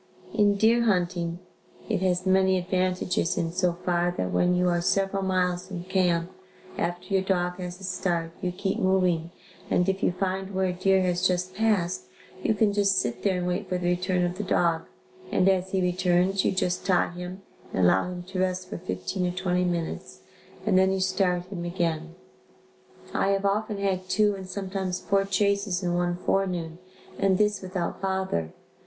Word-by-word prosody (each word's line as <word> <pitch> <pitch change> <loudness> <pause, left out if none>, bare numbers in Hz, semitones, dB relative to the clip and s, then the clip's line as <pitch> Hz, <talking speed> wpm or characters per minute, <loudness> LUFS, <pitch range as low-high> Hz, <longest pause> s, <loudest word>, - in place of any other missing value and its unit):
In 205 -2 +4
deer 230 +3 +4
hunting, 175 -4 0 0.5
it 210 -5 0
has 185 -1 +1
many 190 0 +4
advantages 180 -1 0
in 165 -1 0
so 180 0 +1
far, 175 0 +2
that 90 - -1
when 180 0 +3
you 180 0 +2
are 175 -1 +2
several 195 +2 +1
miles 185 -1 0
from 180 -3 -6
camp, 180 -2 +1 0.4
after 175 +3 -3
your 190 - +4
dog 180 -1 -1
has 180 0 -6
a - - -12
start 175 -3 -1
you 180 - -1
keep 190 +2 -2
moving 180 -3 +2 0.4
and 180 - +2
if 195 0 0
you - - +3
find 190 +1 -3
where 190 0 +2
a 180 - 0
deer 190 +1 +3
has 180 0 +2
just 180 0 -1
passed, 195 -4 0 0.4
you 220 - +1
can 205 -1 +2
just 200 -1 +3
sit 120 -4 -1
there 190 -2 +1
and 180 - -2
wait 180 +1 -2
for 180 - 0
the 180 - -4
return 180 0 +1
of 175 +1 -4
the - - -1
dog 165 -1 +1 0.4
and 185 - +3
as 190 -1 +3
soon - - -16
as - - -14
he 190 - +2 0.2
returns, 180 +2 +3
you - - +2
just 180 -1 -1
tie 180 -3 +2
him 180 +2 -7 0.3
and 95 - 0
allow 95 - +3
him 180 -1 -6
to 185 +1 -5
rest 185 0 -1
for - - -4
fifteen 95 - -2
or - - -1
twenty 180 -1 +1
minutes 170 - -3 0.4
and 190 -3 +4
then 190 0 +4
you 190 - 0
start 185 -1 +1
him 185 -2 -6
again. 170 -1 -2 1.0
I - - +1
have 195 0 +1
often 210 +1 0
had 190 -2 -1
two 210 +1 +3
and 190 -1 -8
sometimes 190 -1 -3
four 195 0 +1
chases 200 -1 +1
in 175 -1 0
one 175 0 0
forenoon 180 -3 -1 0.4
and 195 -1 +3
this 210 -1 +1
without 185 -2 -4
bother. 190 - -1
185 Hz, 190 wpm, -26 LUFS, 175-195 Hz, 1.0 s, In